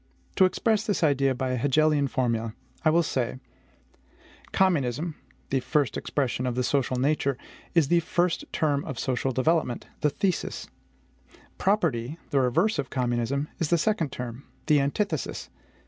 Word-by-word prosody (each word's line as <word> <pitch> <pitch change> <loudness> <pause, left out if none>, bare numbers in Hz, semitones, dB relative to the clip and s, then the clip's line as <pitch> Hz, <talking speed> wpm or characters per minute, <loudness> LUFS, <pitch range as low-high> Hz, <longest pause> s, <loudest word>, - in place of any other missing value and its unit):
To 190 - +7
express 215 +3 +1
this 205 -5 -1
idea 140 -3 +3
by 130 +1 -2
an 125 - -1
Hegelian 145 +2 +3
formula, 115 -4 -1 0.3
I 155 - +5
will 170 +2 +4
say: 130 -5 -1 1.1
Communism 160 -4 +1 0.4
the 135 - +2
first 145 -1 0
expression 130 -2 -1
of 125 - -1
the 125 - 0
social 130 0 +1
nature 140 0 +1 0.4
is 160 -5 +4
the 175 - +5
first 175 +1 0
term 145 -3 +1
of 135 - -5
social 130 +2 -1
development, 130 -1 +1
the 150 - +2
THESIS; 185 +4 -2 0.9
property, 160 - +1
the 140 - +3
reverse 165 - +2
of 130 - -2
communism, 125 +2 -1
is 165 - 0
the 170 - +4
second 165 -5 0
term, 125 +1 -6 0.2
the 150 -2 +4
ANTITHESIS. 145 +10 -2
140 Hz, 145 wpm, -27 LUFS, 125-165 Hz, 1.1 s, To